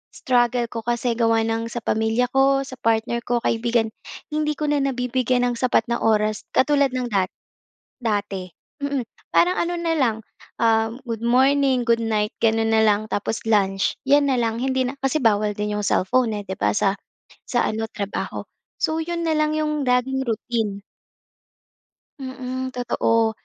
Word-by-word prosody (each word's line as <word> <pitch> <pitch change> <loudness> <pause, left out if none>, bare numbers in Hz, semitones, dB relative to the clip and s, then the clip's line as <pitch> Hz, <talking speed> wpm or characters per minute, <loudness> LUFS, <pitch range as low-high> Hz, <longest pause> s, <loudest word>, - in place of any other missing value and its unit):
Struggle 240 -1 +1
ko 230 - -4
kasi 240 0 -1
gawa 225 -1 +3
ng 225 0 -1
sa 230 -1 -6
pamilya 220 +3 +1
ko, 275 0 +3
sa 260 -1 -10
partner 230 +1 +1
ko, 240 -1 0
kaibigan. 230 -1 +1 0.4
Hindi 300 0 0
ko 300 0 -1
na 290 - +2
nabibigyan 255 -2 0
ng 235 - -5
sapat 250 -3 +2
na 235 - 0
oras 215 -1 +1
katulad 280 -1 +3
ng 245 -2 -2
dat 190 -2 +1 0.8
dati. 200 -4 -2 0.3
Mm. 280 -3 -1 0.3
Parang 360 +1 +4
ano 345 +1 0
na 330 -1 0
lang, 240 -6 +2 0.4
um, 225 +1 +2
"Good 230 0 -4
morning, 260 0 +3
goodnight," 225 -2 +1
gano'n 225 0 +2
na 220 0 +4
lang. 215 0 +2
Tapos 215 +2 -2
lunch. 195 -3 +2
'Yan 285 +1 +4
na 265 - +2
lang 230 -1 -1
hindi 260 0 0
na 250 - -2
kasi 270 0 0
bawal 210 -1 +2
din 210 0 -2
'yong 210 0 -2
cellphone 225 +2 +1
eh, 205 - -5
'di 190 -1 -5
ba, - - +3
sa 195 -1 +3 0.6
sa 240 - +1
ano, 220 +1 -2
trabaho. 205 -2 -4 0.3
So, 315 +1 0
'yon 335 +1 -3
na 320 - +1
lang 305 0 +1
'yong 300 -1 -1
laging 255 +2 +1
routine. 220 -3 -2 1.4
Mm. 260 -1 -5
Totoo. 230 -2 +1
235 Hz, 165 wpm, -22 LUFS, 220-265 Hz, 1.4 s, Parang